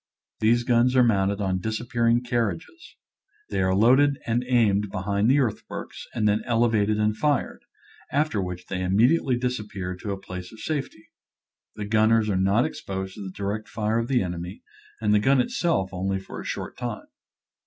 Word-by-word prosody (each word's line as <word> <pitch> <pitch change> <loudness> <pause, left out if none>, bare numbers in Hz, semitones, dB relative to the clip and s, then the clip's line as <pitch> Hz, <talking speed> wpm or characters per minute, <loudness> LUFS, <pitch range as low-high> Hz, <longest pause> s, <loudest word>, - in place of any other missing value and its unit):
These 120 +2 +3
guns 120 +1 +3
are 125 - +6
mounted 100 -3 +2
on 95 -2 0
disappearing 115 +3 0
carriages. 120 - -3 0.6
They - - 0
are 95 0 +2
loaded 130 +7 +4
and 120 +2 0
aimed 105 -5 +2
behind 100 +2 0
the 135 - +5
earthworks 120 -7 -4
and 110 -2 +1
then 105 +1 +2
elevated 115 -3 +2
and 105 0 +1
fired, 145 +5 0 0.5
after 145 -7 +1
which 90 -1 -5
they 95 -1 -4
im 90 +1 0
mediately 125 +3 +3
disappear 105 -7 -3
to 100 - -7
a 100 -1 -3
place 90 -1 -8
of 110 - -13
safety. 140 -8 -4 0.7
The 105 -1 -5
gunners 110 0 +3
are - - 0
not 95 +6 +3
exposed 95 -1 -5
to 105 - -10
the 95 - -5
direct 100 +3 -4
fire 110 +1 0
of 115 - -2
the 125 -5 +2
enemy, 90 0 -6 0.4
and 105 -1 +2
the 105 - +5
gun 135 +5 +3
itself 125 - 0
only 95 +1 -1
for 95 - -8
a - - -10
short - - -5
time. - - -5
110 Hz, 175 wpm, -25 LUFS, 95-120 Hz, 0.7 s, are